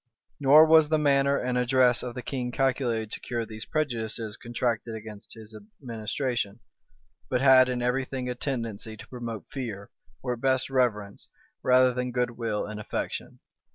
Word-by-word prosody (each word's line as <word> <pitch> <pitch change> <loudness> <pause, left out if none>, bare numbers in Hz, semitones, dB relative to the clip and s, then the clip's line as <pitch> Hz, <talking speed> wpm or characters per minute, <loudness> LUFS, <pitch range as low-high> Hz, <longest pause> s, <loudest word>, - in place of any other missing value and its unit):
Nor 145 +3 +8
was 160 -1 +6
the 155 - +3
manner 140 -1 +3
and 125 0 -1
address 125 0 +3
of 125 -1 -6
the 125 - -6
king 125 -3 -3
calculated 120 -4 0
to - - -3
cure 120 -2 -3
these 110 0 -6
prejudices 115 -7 -2
contracted 115 -1 -2
against 105 -1 -10
his 110 -1 -11 0.2
administration; 115 -2 -3 0.7
but 125 - +1
had 130 -1 +6
in 125 -1 -2
every 125 +2 +1
thing 130 -1 -5
a 125 - -1
tendency 115 -4 -4
to - - -12
promote 120 -4 -6
fear, 110 -7 -6 0.3
or 125 -2 -1
at 120 - -9
best 130 0 +1
reverence, 105 -6 0 0.3
rather 130 0 +4
than 125 0 -2
good 125 0 0
will 115 -3 -3
and 105 0 -7
affection. 105 - -5
125 Hz, 165 wpm, -27 LUFS, 110-130 Hz, 0.7 s, Nor